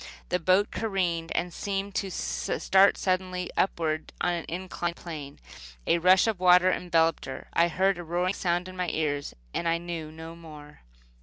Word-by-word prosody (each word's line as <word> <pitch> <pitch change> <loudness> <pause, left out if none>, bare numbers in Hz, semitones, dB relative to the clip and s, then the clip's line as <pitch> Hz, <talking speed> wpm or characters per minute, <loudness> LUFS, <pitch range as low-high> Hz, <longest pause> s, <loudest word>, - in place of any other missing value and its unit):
The 180 - +1
boat 185 +4 +3
careened 180 -6 -1
and 175 0 -1
seemed 200 +1 -3
to 195 0 -2
start 170 - +2
suddenly 185 -1 -1
upward 160 -4 -1
on 175 - +1
an 170 -1 -3
inclined 175 -1 -3
plane. 150 -5 -8 0.5
A 170 - +3
rush 185 +2 +5
of 220 -5 -1
water 180 0 +6
enveloped 165 -3 +1
her. 130 0 -8
I 170 - +4
heard 190 +2 +1
a - - -5
roaring 175 +3 0
sound 175 -1 -1
in 185 - -9
my 180 -1 -1
ears, 145 -3 -2 0.2
and 170 - -1
I 165 0 +2
knew 170 -2 -6
no 160 +1 -9
more. 150 -3 -13
175 Hz, 170 wpm, -27 LUFS, 165-185 Hz, 0.5 s, water